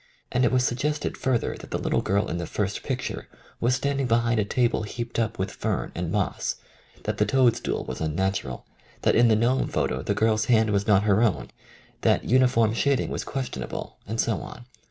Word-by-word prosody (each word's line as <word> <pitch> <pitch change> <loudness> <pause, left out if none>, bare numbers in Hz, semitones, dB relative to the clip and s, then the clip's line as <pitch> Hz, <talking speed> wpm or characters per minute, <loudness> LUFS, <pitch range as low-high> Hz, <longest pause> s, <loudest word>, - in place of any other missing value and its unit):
and 125 - +2
it 120 - +3
was 125 -1 +3
suggested 150 +5 -1
further 130 -3 0
that - - -11
the - - -1
little - - 0
girl 100 +1 +1
in 85 - -3
the 85 - -4
first 100 -1 -2
picture 130 -3 -4 0.3
was 120 +2 +2
stand 140 +1 -1
ing 130 - 0
behind 115 0 +2
a - - +3
table 120 +2 +1
heaped 115 +3 -4
up 115 0 -1
with 95 - -2
fern - - -2
and - - -3
moss, - - -1 0.5
that - - -3
the - - +5
toad 125 0 +4
stool 120 - -3
was 65 - -6
unnatural, 80 -4 -2 0.4
that - - +4
in 120 +1 +6
the 110 - +5
gnome 120 +4 +2
photo 65 - -1
the 100 - -1
girl's 110 0 +2
hand 110 -3 +3
was 100 0 0
not 100 -2 +5
her 105 0 +3
own, 85 - +1 0.5
that - - +3
uniform 125 -3 +3
shading 140 +3 +1
was - - -3
question 130 - -4
able, - - -6
and 110 +2 -3
so 115 - +1
on. 120 - -10
115 Hz, 210 wpm, -25 LUFS, 100-125 Hz, 0.5 s, in